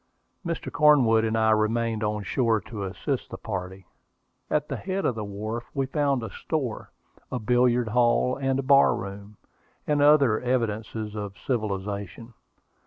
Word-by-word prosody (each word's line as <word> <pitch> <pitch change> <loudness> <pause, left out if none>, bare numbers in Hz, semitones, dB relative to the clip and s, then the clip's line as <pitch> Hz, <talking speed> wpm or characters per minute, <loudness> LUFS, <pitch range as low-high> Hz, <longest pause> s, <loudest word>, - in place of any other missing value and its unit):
Mr. 170 -2 -4
Cornwood 130 -8 +5
and 110 0 0
I 110 0 +3
remained 110 +1 +1
on 105 -1 -1
shore 115 +2 +1
to 100 +1 -6
assist 125 +8 -3
the - - -7
party. 95 -2 -6 0.6
At 150 -1 0
the - - -3
head 190 +1 -3
of - - +2
the 110 -1 -5
wharf 110 +4 -5
we 135 -1 +1
found 140 -2 0
a 115 - -6
store, 135 -9 -4 0.4
a - - -1
billiard 120 0 +2
hall 120 +2 +2
and 135 -1 0
a 135 - -1
bar 140 +1 +5
room, 100 +2 -8 0.5
and 150 -1 +1
other 140 -6 +5
evidences 110 -3 -2
of 105 -2 -6
civilization. 105 -1 -3
115 Hz, 155 wpm, -26 LUFS, 105-130 Hz, 0.6 s, Cornwood